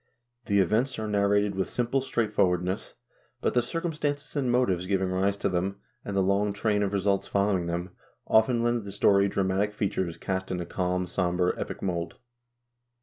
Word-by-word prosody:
The 100 Hz, -, +1 dB
events 110 Hz, +8 st, +2 dB
are 110 Hz, -1 st, -3 dB
nar 100 Hz, -1 st, +2 dB
rated 100 Hz, 0 st, +2 dB
with 95 Hz, -1 st, -2 dB
simple 125 Hz, +2 st, 0 dB
straightforwardness, 95 Hz, -7 st, 0 dB, 0.4 s
but -, -, 0 dB
the 125 Hz, -, +4 dB
circumstances 150 Hz, +1 st, -3 dB
and 130 Hz, -4 st, +1 dB
motives 95 Hz, -8 st, +1 dB
giving 95 Hz, -1 st, +1 dB
rise 95 Hz, +2 st, +1 dB
to -, -, 0 dB
them, 95 Hz, +1 st, -1 dB, 0.2 s
and 100 Hz, -1 st, -3 dB
the 95 Hz, -, +3 dB
long 100 Hz, +2 st, +1 dB
train 105 Hz, 0 st, +1 dB
of 100 Hz, -1 st, 0 dB
results 100 Hz, 0 st, +1 dB
following 100 Hz, -3 st, +1 dB
them, 85 Hz, +2 st, -3 dB, 0.3 s
often 115 Hz, +2 st, +3 dB
lend 120 Hz, -1 st, +1 dB
the 100 Hz, -, -7 dB
story 100 Hz, 0 st, +4 dB
dramatic 100 Hz, +1 st, 0 dB
features 95 Hz, -4 st, -2 dB
cast 95 Hz, 0 st, -3 dB
in 90 Hz, -, -2 dB
a 85 Hz, -, -3 dB
calm 90 Hz, +1 st, -1 dB
and 90 Hz, -, -7 dB
som 90 Hz, -1 st, 0 dB
ber 90 Hz, 0 st, +2 dB
epic -, -, -5 dB
mold. 85 Hz, -3 st, -2 dB
100 Hz, 185 wpm, -27 LUFS, 95-110 Hz, 0.4 s, the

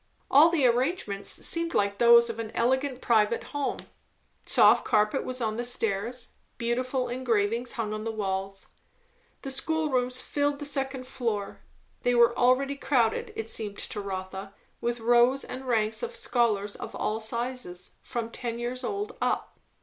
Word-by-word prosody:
All 300 Hz, +5 st, +8 dB
the 325 Hz, -6 st, +2 dB
arrangements 240 Hz, -, 0 dB
seemed 335 Hz, 0 st, 0 dB
like 200 Hz, 0 st, +1 dB
those 235 Hz, 0 st, +7 dB
of 230 Hz, -1 st, -5 dB
an 225 Hz, -1 st, -4 dB
elegant 260 Hz, +2 st, 0 dB
private 225 Hz, -1 st, +2 dB
home; 285 Hz, -1 st, -1 dB, 0.7 s
soft -, -, +6 dB
carpet 215 Hz, +5 st, +2 dB
was 255 Hz, 0 st, -4 dB
on 220 Hz, -1 st, -1 dB
the 240 Hz, -, -2 dB
stairs, 235 Hz, 0 st, -2 dB, 0.3 s
beautiful 250 Hz, +2 st, -1 dB
engravings 235 Hz, -1 st, 0 dB
hung 215 Hz, -3 st, -3 dB
on 215 Hz, 0 st, -4 dB
the 225 Hz, -, -2 dB
walls. 195 Hz, -2 st, -3 dB, 0.8 s
The 270 Hz, -, -4 dB
school 315 Hz, +2 st, 0 dB
rooms 250 Hz, 0 st, +1 dB
filled 285 Hz, +2 st, -1 dB
the 290 Hz, -, -6 dB
second 270 Hz, -2 st, -2 dB
floor; 230 Hz, -6 st, -3 dB, 0.4 s
they 245 Hz, 0 st, +2 dB
were 235 Hz, 0 st, +5 dB
already 270 Hz, +3 st, +2 dB
crowded, 240 Hz, -6 st, +1 dB
it 225 Hz, 0 st, -4 dB
seemed 205 Hz, -2 st, -3 dB
to 210 Hz, -, -4 dB
Rotha, 190 Hz, 0 st, -6 dB, 0.3 s
with 240 Hz, 0 st, -1 dB
rows 240 Hz, +3 st, +4 dB
and 260 Hz, +1 st, -7 dB
ranks 220 Hz, -3 st, +1 dB
of 475 Hz, 0 st, -4 dB
scholars 215 Hz, -, 0 dB
of -, -, -8 dB
all 215 Hz, +1 st, -1 dB
sizes, 235 Hz, -4 st, -4 dB
from 230 Hz, -1 st, -4 dB
ten 235 Hz, -1 st, -4 dB
years 245 Hz, +2 st, -4 dB
old 410 Hz, -, -3 dB
up. -, -, -1 dB
240 Hz, 155 wpm, -27 LUFS, 215-260 Hz, 0.8 s, All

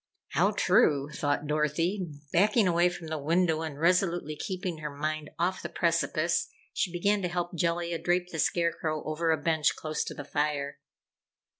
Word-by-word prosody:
"How -, -, +3 dB
true," 140 Hz, 0 st, +3 dB
thought 145 Hz, 0 st, -1 dB
Dorothy. 155 Hz, +6 st, 0 dB, 0.3 s
Backing 210 Hz, +3 st, +4 dB
away 175 Hz, 0 st, +4 dB
from 175 Hz, -1 st, -8 dB
the 160 Hz, -1 st, -3 dB
window 165 Hz, +2 st, +2 dB
and 155 Hz, -3 st, -5 dB
resolutely 175 Hz, -2 st, +2 dB
keeping 185 Hz, 0 st, -4 dB
her 150 Hz, 0 st, -4 dB
mind 155 Hz, +1 st, -3 dB
off 180 Hz, +3 st, 0 dB
the -, -, -5 dB
precipice, 170 Hz, 0 st, +1 dB, 0.3 s
she 180 Hz, -, 0 dB
began 200 Hz, +4 st, +1 dB
to 180 Hz, -, 0 dB
help 175 Hz, 0 st, -3 dB
Jellia 170 Hz, 0 st, -1 dB
drape 180 Hz, 0 st, 0 dB
the 160 Hz, -, -4 dB
Scarecrow 165 Hz, -2 st, 0 dB
over 155 Hz, +2 st, -1 dB
a 160 Hz, -, +4 dB
bench 155 Hz, 0 st, +1 dB
close 155 Hz, -1 st, -2 dB
to -, -, -6 dB
the 145 Hz, -, -7 dB
fire. 145 Hz, -1 st, -1 dB
165 Hz, 165 wpm, -29 LUFS, 150-175 Hz, 0.3 s, Backing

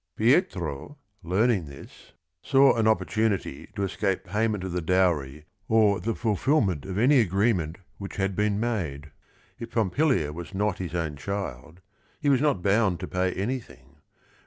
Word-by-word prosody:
Pietro, 110 Hz, -, 0 dB, 0.2 s
learning 95 Hz, 0 st, +1 dB
this, 70 Hz, -1 st, -14 dB, 0.3 s
saw 135 Hz, 0 st, +4 dB
an 115 Hz, -2 st, +2 dB
opportunity 110 Hz, -8 st, 0 dB
to 100 Hz, -, -2 dB
escape 95 Hz, 0 st, -1 dB
payment 105 Hz, -2 st, -1 dB
of 95 Hz, -, -4 dB
the 90 Hz, 0 st, -2 dB
dowry 80 Hz, -5 st, 0 dB, 0.2 s
or 110 Hz, -3 st, +3 dB
the 115 Hz, 0 st, -2 dB
fulfilment 110 Hz, -, 0 dB
of 95 Hz, 0 st, -4 dB
any 130 Hz, +5 st, +5 dB
agreement 95 Hz, -5 st, +1 dB, 0.2 s
which 100 Hz, -1 st, -7 dB
had 95 Hz, -1 st, -1 dB
been 105 Hz, 0 st, +1 dB
made. 80 Hz, -11 st, -3 dB, 0.5 s
If 115 Hz, -, -6 dB
Pompilia 110 Hz, -, +1 dB
was 85 Hz, +4 st, -8 dB
not 105 Hz, -1 st, 0 dB
his 90 Hz, -2 st, -5 dB
own 80 Hz, -4 st, -2 dB
child, 85 Hz, -2 st, -6 dB, 0.4 s
he 145 Hz, -, +1 dB
was 135 Hz, -2 st, +3 dB
not 145 Hz, -12 st, +1 dB
bound 100 Hz, -3 st, +2 dB
to 90 Hz, -, -4 dB
pay 90 Hz, 0 st, 0 dB
anything. 120 Hz, +5 st, -5 dB
100 Hz, 150 wpm, -26 LUFS, 85-115 Hz, 0.5 s, any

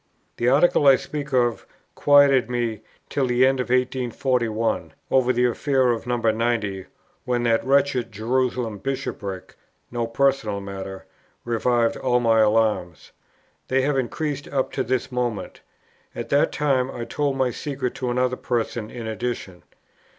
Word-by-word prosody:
The 120 Hz, -, 0 dB
article 145 Hz, +1 st, +4 dB
I 135 Hz, -, +9 dB
speak 145 Hz, +1 st, -5 dB
of 120 Hz, -3 st, +1 dB, 0.3 s
quieted 140 Hz, -3 st, +5 dB
me 120 Hz, -3 st, -2 dB, 0.3 s
till 135 Hz, -2 st, 0 dB
the 125 Hz, +1 st, +4 dB
end 135 Hz, 0 st, +2 dB
of 125 Hz, -, 0 dB
1841, 125 Hz, -2 st, 0 dB, 0.2 s
over 130 Hz, -1 st, +4 dB
the 125 Hz, 0 st, +2 dB
affair 130 Hz, +1 st, +2 dB
of 115 Hz, +1 st, -3 dB
No. 125 Hz, 0 st, 0 dB
90, 110 Hz, -4 st, 0 dB, 0.4 s
when 120 Hz, -1 st, 0 dB
that 115 Hz, -1 st, +2 dB
wretched 135 Hz, -3 st, +1 dB
Jerusalem 120 Hz, 0 st, -1 dB
Bishopric 100 Hz, -8 st, -5 dB, 0.4 s
(no 120 Hz, -1 st, -2 dB
personal 115 Hz, -4 st, +1 dB
matter) 95 Hz, -1 st, -7 dB, 0.4 s
revived 120 Hz, 0 st, +1 dB
all 125 Hz, -2 st, +1 dB
my 115 Hz, -2 st, +3 dB
alarms. 105 Hz, -6 st, +1 dB, 0.6 s
They 130 Hz, 0 st, +1 dB
have 145 Hz, +1 st, +1 dB
increased 145 Hz, +2 st, -3 dB
up 135 Hz, -2 st, -1 dB
to 130 Hz, -, -1 dB
this 130 Hz, +1 st, -2 dB
moment. 120 Hz, -6 st, -3 dB, 0.5 s
At 120 Hz, -1 st, -5 dB
that 140 Hz, -, +3 dB
time 135 Hz, -3 st, +1 dB
I 120 Hz, -3 st, -5 dB
told 140 Hz, 0 st, -1 dB
my 130 Hz, -2 st, +1 dB
secret 135 Hz, -2 st, -4 dB
to 130 Hz, -2 st, -2 dB
another 125 Hz, +1 st, 0 dB
person 115 Hz, -2 st, -2 dB
in 120 Hz, -2 st, -7 dB
addition. 110 Hz, -5 st, -4 dB
125 Hz, 145 wpm, -23 LUFS, 115-130 Hz, 0.6 s, I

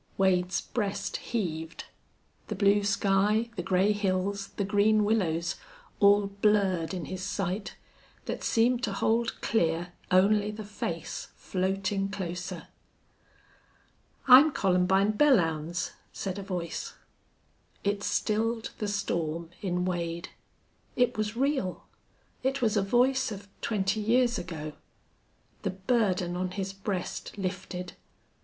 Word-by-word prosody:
Wade's 185 Hz, -1 st, +2 dB
breast 200 Hz, -3 st, -2 dB
heaved. 165 Hz, -8 st, -4 dB, 0.6 s
The -, -, -3 dB
blue 200 Hz, +1 st, +4 dB
sky, 205 Hz, +3 st, +2 dB
the 180 Hz, -, -2 dB
gray 190 Hz, +3 st, +2 dB
hills, 200 Hz, -1 st, -1 dB
the 200 Hz, -, +1 dB
green 210 Hz, +1 st, +3 dB
willows, 170 Hz, -6 st, 0 dB, 0.4 s
all 205 Hz, 0 st, +6 dB
blurred 200 Hz, -4 st, +1 dB
in 180 Hz, -4 st, -4 dB
his 185 Hz, +3 st, -5 dB
sight, 195 Hz, +1 st, -3 dB, 0.5 s
that -, -, -4 dB
seemed 240 Hz, +2 st, +3 dB
to -, -, 0 dB
hold 230 Hz, +1 st, 0 dB
clear 175 Hz, -4 st, 0 dB, 0.2 s
only 205 Hz, +3 st, +4 dB
the 215 Hz, +1 st, -6 dB
face 175 Hz, -6 st, -5 dB
floating 195 Hz, +1 st, -1 dB
closer. 180 Hz, -3 st, -5 dB, 1.6 s
"I'm 265 Hz, +4 st, +10 dB
Columbine 190 Hz, 0 st, +3 dB
Belllounds," 175 Hz, -, +2 dB, 0.2 s
said 195 Hz, 0 st, -4 dB
a -, -, -4 dB
voice. 180 Hz, -3 st, -4 dB, 0.9 s
It 200 Hz, 0 st, 0 dB
stilled 225 Hz, +2 st, 0 dB
the 210 Hz, -, -1 dB
storm 170 Hz, -5 st, -2 dB
in 180 Hz, -2 st, -1 dB
Wade. 170 Hz, -1 st, -3 dB, 0.7 s
It 245 Hz, 0 st, +2 dB
was 215 Hz, +1 st, -2 dB
real. 265 Hz, -9 st, 0 dB, 0.6 s
It 270 Hz, +1 st, 0 dB
was 225 Hz, -4 st, +1 dB
a 205 Hz, -, +3 dB
voice 250 Hz, +5 st, +2 dB
of 200 Hz, -1 st, -7 dB
twenty 205 Hz, -1 st, 0 dB
years 240 Hz, +3 st, +2 dB
ago. 155 Hz, -4 st, -6 dB, 0.9 s
The -, -, -1 dB
burden 190 Hz, -3 st, 0 dB
on 185 Hz, +1 st, -1 dB
his 195 Hz, +1 st, -4 dB
breast 195 Hz, 0 st, -4 dB
lifted. 180 Hz, -1 st, -4 dB
195 Hz, 120 wpm, -29 LUFS, 180-215 Hz, 1.6 s, I'm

